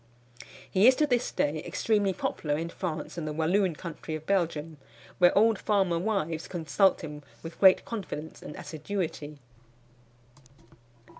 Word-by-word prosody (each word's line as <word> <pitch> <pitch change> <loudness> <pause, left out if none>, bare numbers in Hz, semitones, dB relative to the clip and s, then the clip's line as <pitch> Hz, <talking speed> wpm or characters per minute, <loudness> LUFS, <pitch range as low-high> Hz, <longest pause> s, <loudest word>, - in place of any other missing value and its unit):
He 195 +4 +4
is 260 - +7
to 305 - +3
this 250 -4 0
day 150 +1 0
extremely 205 -3 +1
popular 150 -4 -2
in 165 +2 -3
France 170 -2 -5
and 155 - -4
the 150 - -3
Walloon 170 +3 +1
country 160 -1 -6
of 155 0 -8
Belgium, 165 -5 -1 0.4
where 175 +1 +5
old 220 0 +4
farmer 190 -5 +1
wives 170 -5 -2
consult 175 +2 +2
him 150 -2 -7 0.2
with 165 0 -9
great 190 -1 +6
confidence 160 -8 -6
and - - -8
assiduity. 155 -2 -5
170 Hz, 140 wpm, -28 LUFS, 155-200 Hz, 0.4 s, is